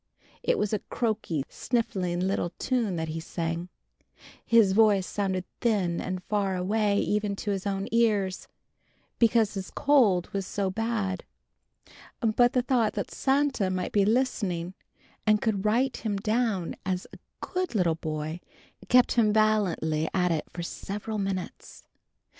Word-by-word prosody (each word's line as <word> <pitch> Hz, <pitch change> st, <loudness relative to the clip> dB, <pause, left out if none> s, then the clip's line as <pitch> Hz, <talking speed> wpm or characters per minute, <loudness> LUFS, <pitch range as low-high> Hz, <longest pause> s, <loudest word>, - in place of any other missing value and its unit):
It -, -, +1 dB
was 210 Hz, -, -1 dB
a 210 Hz, -, 0 dB
choky, 215 Hz, -, -1 dB
sniffling 190 Hz, -8 st, -1 dB
little 185 Hz, -2 st, -1 dB
tune 235 Hz, -8 st, 0 dB
that 160 Hz, -1 st, -3 dB
he 160 Hz, +1 st, -3 dB
sang. 170 Hz, +1 st, -4 dB, 0.7 s
His 225 Hz, -4 st, +5 dB
voice 205 Hz, -2 st, +4 dB
sounded 190 Hz, -3 st, -2 dB
thin 195 Hz, -7 st, +1 dB
and 185 Hz, -1 st, -4 dB
far 200 Hz, -2 st, 0 dB
away 200 Hz, +3 st, +1 dB
even 210 Hz, -1 st, 0 dB
to 205 Hz, +1 st, -3 dB
his 195 Hz, 0 st, -2 dB
own 195 Hz, 0 st, -2 dB
ears, 210 Hz, -5 st, +1 dB, 0.7 s
because 225 Hz, -2 st, +3 dB
his 195 Hz, -2 st, -5 dB
cold 225 Hz, -12 st, +3 dB
was 195 Hz, -1 st, -2 dB
so 195 Hz, -2 st, -1 dB
bad. 210 Hz, -3 st, -2 dB, 1.0 s
But 240 Hz, +1 st, +3 dB
the 250 Hz, -, +2 dB
thought 240 Hz, -4 st, +2 dB
that 200 Hz, -, -4 dB
Santa 270 Hz, -7 st, +1 dB
might 185 Hz, -1 st, -2 dB
be 205 Hz, -, +3 dB
listening, 200 Hz, -6 st, 0 dB, 0.5 s
and 215 Hz, 0 st, +5 dB
would 210 Hz, -3 st, 0 dB
write 240 Hz, +5 st, +2 dB
him 210 Hz, -3 st, -2 dB
down 215 Hz, -3 st, -1 dB
as 185 Hz, -1 st, -2 dB
a -, -, -11 dB, 0.2 s
good 365 Hz, -8 st, -3 dB
little 175 Hz, -5 st, +3 dB
boy, 155 Hz, 0 st, -4 dB, 0.5 s
kept 250 Hz, 0 st, +5 dB
him 220 Hz, -3 st, +3 dB
valiantly 195 Hz, -8 st, +1 dB
at 180 Hz, -1 st, +2 dB
it 160 Hz, -2 st, -1 dB
for 175 Hz, -, -5 dB
several 210 Hz, +5 st, -5 dB
minutes. 195 Hz, -2 st, -5 dB
200 Hz, 145 wpm, -27 LUFS, 185-225 Hz, 1.0 s, His